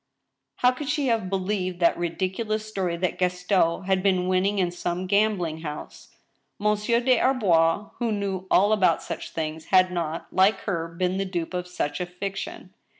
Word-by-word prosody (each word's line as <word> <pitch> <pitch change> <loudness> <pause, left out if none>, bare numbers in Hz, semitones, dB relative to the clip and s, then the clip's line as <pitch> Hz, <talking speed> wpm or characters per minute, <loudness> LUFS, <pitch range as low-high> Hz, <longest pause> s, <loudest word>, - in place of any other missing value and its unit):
How 250 - +4
could 270 +3 -6
she 290 -3 +1
have 225 -5 0
believed 185 -1 -2
that 170 - +4
ridiculous 190 +5 -2
story 185 -5 -2
that 185 +1 -2
Gaston 180 -1 +1
had 190 0 +1
been 185 -2 +2
winning 185 +2 +1
in 180 -2 +1
some 175 +1 -3
gambling 185 -5 +1
house? 150 -2 -7 0.5
Monsieur 210 +3 +1
des 250 -1 +3
Arbois, 200 -7 +2
who 235 -2 0
knew 195 -3 -3
all 205 +3 +4
about 185 -6 +3
such - - -6
things, 160 0 -4
had 185 -1 +4
npt, 170 -2 -3
like 190 +3 +3
her, 170 -5 -2
been 180 +2 -2
the 195 - 0
dupe 175 -2 -4
of 180 0 -3
such 180 -2 -3
a 180 - -2
fiction. 195 - -6
185 Hz, 170 wpm, -25 LUFS, 175-210 Hz, 0.5 s, How